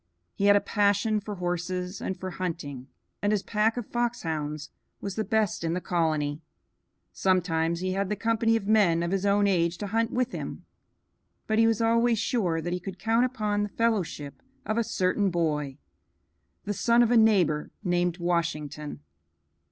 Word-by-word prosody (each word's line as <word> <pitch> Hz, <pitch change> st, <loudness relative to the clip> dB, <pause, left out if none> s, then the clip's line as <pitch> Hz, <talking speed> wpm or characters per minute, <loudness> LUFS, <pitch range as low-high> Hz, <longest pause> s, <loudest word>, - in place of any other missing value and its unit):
He 200 Hz, -, -1 dB
had 205 Hz, 0 st, +7 dB
a -, -, +6 dB
passion 205 Hz, +1 st, +2 dB
for 205 Hz, 0 st, -6 dB
horses 180 Hz, +1 st, -3 dB
and 190 Hz, -, -4 dB
for 185 Hz, 0 st, -5 dB
hunting, 155 Hz, -8 st, -5 dB, 0.3 s
and 205 Hz, -, +1 dB
his 205 Hz, -2 st, +1 dB
pack 220 Hz, +2 st, +1 dB
of 240 Hz, -, -3 dB
foxhounds 160 Hz, -12 st, -3 dB, 0.3 s
was 200 Hz, -, -4 dB
the 220 Hz, -, -1 dB
best 215 Hz, -5 st, 0 dB
in 165 Hz, +1 st, 0 dB
the -, -, 0 dB
colony. 155 Hz, -4 st, -1 dB, 0.7 s
Sometimes 170 Hz, -3 st, +1 dB
he 185 Hz, 0 st, -1 dB
had 195 Hz, 0 st, -1 dB
the 210 Hz, -, 0 dB
company 225 Hz, +2 st, +1 dB
of 225 Hz, -3 st, -1 dB
men 195 Hz, -6 st, +3 dB
of 170 Hz, -, -2 dB
his 195 Hz, +1 st, 0 dB
own 200 Hz, +1 st, +3 dB
age 170 Hz, -3 st, +1 dB
to 205 Hz, -, -4 dB
hunt 225 Hz, +3 st, 0 dB
with 255 Hz, 0 st, -1 dB
him, -, -, -6 dB, 0.8 s
but 220 Hz, 0 st, +1 dB
he 225 Hz, -, +5 dB
was 225 Hz, -1 st, +1 dB
always 230 Hz, +1 st, +3 dB
sure 185 Hz, -8 st, 0 dB
that 175 Hz, +2 st, -3 dB
he 180 Hz, -, -2 dB
could 185 Hz, +1 st, -7 dB
count 225 Hz, +5 st, +2 dB
upon 215 Hz, -5 st, -1 dB
the 205 Hz, -, -1 dB
fellowship 190 Hz, -11 st, -1 dB, 0.2 s
of 215 Hz, -, -1 dB
a -, -, +2 dB
certain 195 Hz, 0 st, +1 dB
boy, 150 Hz, -5 st, -1 dB, 0.9 s
the 205 Hz, -, -1 dB
son 235 Hz, +3 st, +4 dB
of 235 Hz, -, +1 dB
a -, -, +4 dB
neighbor, 190 Hz, -9 st, +3 dB
named 175 Hz, -2 st, +1 dB
Washington. 155 Hz, -, -2 dB
190 Hz, 175 wpm, -27 LUFS, 170-220 Hz, 0.9 s, had